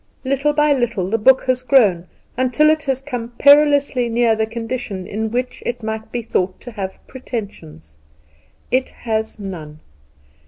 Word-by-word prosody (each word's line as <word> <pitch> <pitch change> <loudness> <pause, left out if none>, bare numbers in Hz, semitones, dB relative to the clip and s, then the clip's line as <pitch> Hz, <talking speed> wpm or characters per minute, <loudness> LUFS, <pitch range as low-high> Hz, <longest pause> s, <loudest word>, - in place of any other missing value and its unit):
Little 275 +2 +1
by 295 0 +3
little 235 -8 -1
the 225 - +1
book 260 +5 +5
has 255 -1 0
grown 210 -10 +3 0.3
until 260 +5 +3
it 310 0 0
has 265 -1 -1
come 245 -4 -5
perilously 285 -4 +4
near 230 0 +3
the 220 0 -1
condition 225 -4 -5
in 220 +3 -3
which 250 +2 -3
it 240 -1 -4
might 220 0 -5
be 240 -1 -3
thought 185 -4 -1
to 245 - -9
have 195 -4 -5
Pretensions. 135 - -8 0.7
It 255 +1 +1 0.2
has 220 -1 -2
none! 165 -7 -8
235 Hz, 155 wpm, -19 LUFS, 215-260 Hz, 0.7 s, book